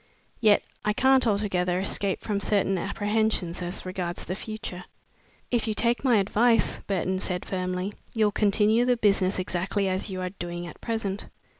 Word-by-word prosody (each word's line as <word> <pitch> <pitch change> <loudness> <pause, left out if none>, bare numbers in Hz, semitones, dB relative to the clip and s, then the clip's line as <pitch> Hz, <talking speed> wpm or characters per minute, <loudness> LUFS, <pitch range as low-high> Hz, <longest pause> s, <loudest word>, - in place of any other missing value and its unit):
Yet 215 -3 +5 0.2
I 210 - +1
can't 260 +1 +4
altogether 185 -4 +1
escape 195 0 -1
from 205 -2 -1
certain 195 -2 +1
apprehensions 205 -2 -1
as 175 +1 -4
regards 180 -1 -4
the 185 - -3
future." 200 -4 -6 0.7
"If 240 -2 +1
you 215 - 0
take 235 +3 +1
my 250 -4 +4
advice," 225 +4 +3
Burton 185 -1 0
said 180 -1 -2
firmly, 185 +1 -2 0.2
"you'll 215 -2 +3
continue 210 +3 +3
the 245 0 +2
business 200 -3 +2
exactly 185 +2 -1
as 190 +2 -1
you 185 -1 -4
are 185 0 -2
doing 175 -2 -5
at 170 - -10
present." 220 -4 -3
200 Hz, 160 wpm, -26 LUFS, 185-220 Hz, 0.7 s, Yet